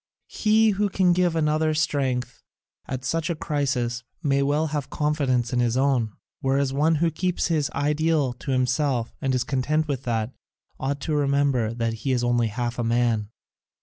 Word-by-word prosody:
He 220 Hz, 0 st, +4 dB
who 205 Hz, +1 st, 0 dB
can 185 Hz, -2 st, +3 dB
give 175 Hz, -1 st, +2 dB
another 155 Hz, 0 st, +1 dB
strength 130 Hz, -5 st, -1 dB, 0.5 s
at 130 Hz, -1 st, -4 dB
such 165 Hz, +5 st, -1 dB
a 170 Hz, -, 0 dB
crisis 130 Hz, -6 st, -1 dB, 0.2 s
may 140 Hz, -2 st, +2 dB
well 145 Hz, +3 st, +1 dB
have 145 Hz, -3 st, -2 dB
confidence 135 Hz, -5 st, 0 dB
in 125 Hz, -, +2 dB
his 120 Hz, 0 st, +1 dB
own, 130 Hz, -5 st, +1 dB, 0.3 s
whereas 135 Hz, 0 st, +1 dB
one 155 Hz, +4 st, +3 dB
who 165 Hz, +2 st, +1 dB
keeps 180 Hz, +3 st, -1 dB
his 155 Hz, -4 st, +1 dB
ideal 150 Hz, -2 st, +1 dB
to 125 Hz, +3 st, -9 dB
himself 130 Hz, -1 st, 0 dB
and 135 Hz, -3 st, 0 dB
is 125 Hz, -, +1 dB
content 150 Hz, +3 st, 0 dB
with 140 Hz, -4 st, -2 dB
that, 115 Hz, 0 st, -1 dB, 0.5 s
ought 140 Hz, +1 st, -2 dB
to 155 Hz, -, -2 dB
remember 140 Hz, -5 st, +1 dB
that 115 Hz, -1 st, -1 dB
he 135 Hz, -, -1 dB
is 120 Hz, -1 st, 0 dB
only 120 Hz, -1 st, +2 dB
half 120 Hz, +3 st, -3 dB
a -, -, 0 dB
man. 115 Hz, -2 st, +1 dB
140 Hz, 175 wpm, -24 LUFS, 125-155 Hz, 0.5 s, He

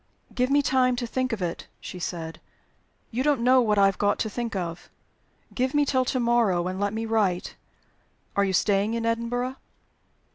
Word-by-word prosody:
"Give 250 Hz, +1 st, +1 dB
me 285 Hz, +1 st, +3 dB
time 255 Hz, -2 st, +3 dB
to 245 Hz, 0 st, -3 dB
think 255 Hz, +2 st, -1 dB
of 215 Hz, -5 st, -2 dB
it," 170 Hz, -1 st, -4 dB
she 180 Hz, -, -8 dB
said. 165 Hz, -2 st, -5 dB, 0.7 s
"You 245 Hz, +2 st, -1 dB
don't 285 Hz, -3 st, +2 dB
know 255 Hz, +1 st, +6 dB
what 210 Hz, -3 st, +1 dB
I 200 Hz, -, +6 dB
have 195 Hz, -1 st, +1 dB
got 205 Hz, 0 st, +2 dB
to 220 Hz, -, -2 dB
think 235 Hz, -2 st, -4 dB
of. 175 Hz, -2 st, -4 dB, 0.6 s
Give 255 Hz, +2 st, -1 dB
me 290 Hz, 0 st, +4 dB
till 260 Hz, -2 st, +1 dB
to 255 Hz, -, 0 dB
morrow; 230 Hz, -7 st, +2 dB
and 185 Hz, +1 st, -4 dB
let 205 Hz, 0 st, 0 dB
me 220 Hz, +1 st, -3 dB
write. 210 Hz, -5 st, 0 dB, 0.8 s
Are 200 Hz, -, +3 dB
you 195 Hz, -1 st, 0 dB
staying 205 Hz, +3 st, +2 dB
in 230 Hz, 0 st, -2 dB
Edinburgh?" 245 Hz, +3 st, -1 dB
230 Hz, 190 wpm, -26 LUFS, 195-255 Hz, 0.8 s, know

